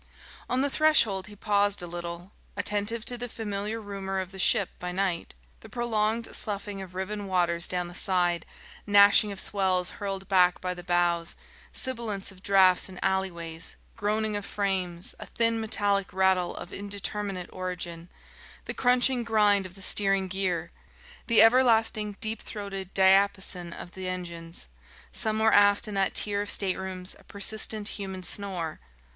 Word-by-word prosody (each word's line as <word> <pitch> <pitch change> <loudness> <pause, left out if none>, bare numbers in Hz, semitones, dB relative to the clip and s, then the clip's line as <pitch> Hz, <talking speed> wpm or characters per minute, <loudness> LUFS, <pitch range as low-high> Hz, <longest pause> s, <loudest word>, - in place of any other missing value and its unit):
On 255 - +1
the 285 - +1
threshold 235 -12 +3
he 210 - -12
paused 205 -1 +1
a - - -4
little, 175 +1 -7 0.3
attentive 210 +2 -1
to 245 -1 -1
the 245 0 -4
familiar 210 0 -4
rumour 195 -2 -4
of 185 -1 -5
the 190 - -10
ship 190 0 +3
by 180 0 -4
night: 180 - -2 0.2
the - - -14
prolonged 230 -1 -1
sloughing 200 -1 -3
of 185 -1 -10
riven 200 +2 -4
waters 175 -2 +2
down 180 -1 -1
the 175 - -10
side, 175 -2 +2 0.4
gnashing 205 +1 +6
of 200 - -6
swells 190 -3 +1
hurled 195 -1 -4
back 180 -2 +4
by 180 0 -3
the 180 - -9
bows, 175 -1 0 0.4
sibilance 230 -7 -2
of 185 -1 -17
draughts 190 -2 +4
in 185 - -10
alleyways, 170 -4 -2 0.2
groaning 215 +1 -1
of 205 - -3
frames, 190 -4 -1
a - - -9
thin 230 -1 0
metallic 200 -2 0
rattle 190 -1 +1
of 175 - -9
indeterminate 200 -2 -4
origin, 180 -2 -6 0.6
the - - -3
crunching 250 0 +3
grind 210 -4 +3
of 180 - -16
the 195 - -9
steering 195 -1 +1
gear, 180 -3 -2 0.6
the 230 -2 +7
everlasting 225 -3 +3
deep 220 0 -2
throated 195 -3 -6
diapason 190 -2 +3
of 175 - -9
the 185 0 -5
engines, 170 - -6 0.4
somewhere 220 0 +1
aft 205 +1 +5
in 210 - -6
that 195 -1 0
tier 205 -1 +3
of 205 - -5
staterooms 185 -1 -1
a - - -19
persistent 215 +1 0
human 190 -2 -6
snore 180 -5 +2
195 Hz, 155 wpm, -27 LUFS, 180-210 Hz, 0.6 s, the